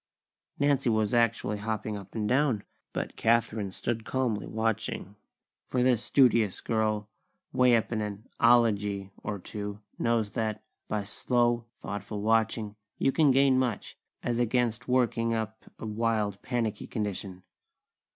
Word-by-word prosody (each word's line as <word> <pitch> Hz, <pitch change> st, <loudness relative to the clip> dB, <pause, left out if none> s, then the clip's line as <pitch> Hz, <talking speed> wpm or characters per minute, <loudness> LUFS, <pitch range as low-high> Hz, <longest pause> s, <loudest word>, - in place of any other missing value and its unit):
Nancy 140 Hz, -3 st, +2 dB
was 110 Hz, -1 st, +1 dB
actually 115 Hz, -3 st, +2 dB
hopping 110 Hz, 0 st, -3 dB
up 100 Hz, 0 st, -9 dB
and 105 Hz, -2 st, -1 dB
down, 125 Hz, -4 st, +2 dB, 0.3 s
but -, -, -4 dB
Kathlyn 110 Hz, -3 st, +1 dB
stood 115 Hz, +4 st, -3 dB
calmly 120 Hz, -4 st, -1 dB
watching; 110 Hz, -2 st, -2 dB, 0.5 s
for 125 Hz, -1 st, +1 dB
this 125 Hz, -3 st, +3 dB
studious 115 Hz, -7 st, +3 dB
girl, 110 Hz, -2 st, 0 dB, 0.5 s
way 125 Hz, -1 st, +5 dB
up 115 Hz, -, 0 dB
in 110 Hz, -2 st, 0 dB
an 105 Hz, +2 st, -5 dB
"ology" 105 Hz, -5 st, +3 dB
or 105 Hz, -, -3 dB
two, 105 Hz, +2 st, -6 dB, 0.2 s
knows 115 Hz, -3 st, +1 dB
that, 110 Hz, -2 st, -2 dB, 0.2 s
by 105 Hz, -1 st, -1 dB
slow, 120 Hz, +3 st, +1 dB
thoughtful 100 Hz, +1 st, -5 dB
watching, 110 Hz, -1 st, +1 dB, 0.2 s
you 135 Hz, -, +2 dB
can 155 Hz, 0 st, +4 dB
gain 135 Hz, 0 st, +5 dB
much, 120 Hz, -5 st, -2 dB, 0.3 s
as 120 Hz, 0 st, 0 dB
against 120 Hz, -1 st, +1 dB
working 115 Hz, -2 st, +2 dB
up 110 Hz, 0 st, -4 dB
a -, -, -7 dB
wild, 110 Hz, -2 st, 0 dB
panicky 115 Hz, -4 st, -2 dB
condition. 100 Hz, -4 st, -4 dB
110 Hz, 135 wpm, -29 LUFS, 105-120 Hz, 0.5 s, way